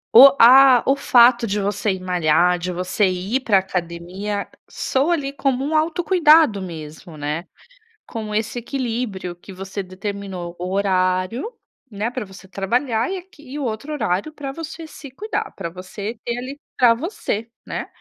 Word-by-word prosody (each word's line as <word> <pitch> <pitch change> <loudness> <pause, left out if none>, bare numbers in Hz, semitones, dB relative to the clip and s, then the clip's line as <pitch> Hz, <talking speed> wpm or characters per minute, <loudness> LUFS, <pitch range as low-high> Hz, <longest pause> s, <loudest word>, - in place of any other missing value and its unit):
O 275 +3 +10
a 255 +1 +8
o 270 - +3
fato 240 -3 +5
de 205 0 -1
você 205 +1 -1
ir 190 - -5
malhar, 180 0 +2
de 180 +1 -3
você 185 +3 0
ir 185 +8 -1
para 220 -6 +3
a - - +5
academia, 185 +2 -4 0.2
soa 280 +6 0
ali 280 -4 -2
como 270 -1 0
um 310 +2 -1
autocuidado 315 - +4
mesmo, 160 -1 -9
né. 150 +4 -3 0.6
Com 215 -2 -5
esse 220 +2 -1
equilíbrio 235 -7 -3
que 190 +2 -13
você 195 +2 -5
determinou 185 -2 -6
o 180 +2 -4
horário, 185 - 0 0.4
né, 210 +1 -3
para 245 -2 -5
você 190 0 -14
trabalhar, 225 - -1
e 385 - -2
aqui 355 -4 -18
e 295 - -4
o - - -3
outro 240 +5 -4
horário 245 +1 -1
para 280 -3 -6
você 325 +2 -8
se 290 -3 -11
cuidar, 425 - -4
para 170 - -5
você 200 +5 -7
ter 235 - -1
ali 270 +3 -7 0.2
para 240 -2 +6
você, 235 - -3 0.2
né? - - -5
215 Hz, 165 wpm, -21 LUFS, 185-270 Hz, 0.6 s, O